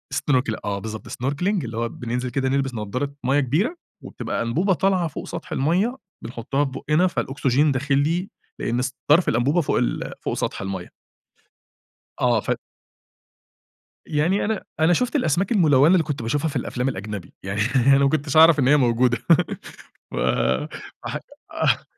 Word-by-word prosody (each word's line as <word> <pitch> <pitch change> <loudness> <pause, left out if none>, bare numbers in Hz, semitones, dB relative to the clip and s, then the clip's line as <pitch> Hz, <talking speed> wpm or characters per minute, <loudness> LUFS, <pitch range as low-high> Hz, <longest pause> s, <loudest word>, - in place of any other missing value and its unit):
snorkel 125 -5 +1
آه، 100 -1 -2
بالضبط، 110 +1 -7
snorkeling 140 +8 -2 0.2
اللي 115 -2 -6
هو 115 0 -1
بننزِل 125 +2 -4
كده 130 +1 -1
نلبِس 135 -1 0
نضّارة 120 +6 -3
مَيَّة 135 +3 +3
كبيرة 155 - 0 0.3
وبتبقى - - -4
أنبوبة 165 - +1
طالعة 185 -1 +1
فوق 155 - -7
سطح - - -7
المَيَّة 185 - +1 0.3
بنحُطّها 120 +5 -2
في 135 - -5
بُقنا 150 +7 +1
فالأُكسجين 145 -2 +1
داخِل 140 +1 0
لي 170 +7 0 0.3
لأن 120 +1 -1
س 125 0 -3
طَرْف 165 +5 +5
الأنبوبة 140 +9 +2
فوق 150 - 0
ال - - -1
فوق - - -2
سطْح - - -3
المَيَّة. 95 -2 -5 1.3
آه، - - +3
ف - - -1 1.5
يعني 165 +6 +1
أنا 215 -1 -2 0.2
أنا 160 +2 +5
شُفت 250 - +1
الأسماك 190 - +1
الملوّنة 155 - +5
اللي 185 -3 +4
كنت 145 -5 -4
باشوفها 145 +7 0
في 145 - -6
الأفلام 125 +1 -1
الأجنبي، 105 -6 -6
يعني 100 +2 -3 0.3
أنا 135 0 +7
ما 140 0 +4
كنتش 145 0 -1
أعرَف 160 -1 +8
إن 130 -2 +3
هي 150 - +6
موجودة، 120 -2 +2 0.9
و - - -3 0.9
ح - - -3 0.4
آه. - - +1
140 Hz, 160 wpm, -23 LUFS, 120-160 Hz, 1.5 s, أعرَف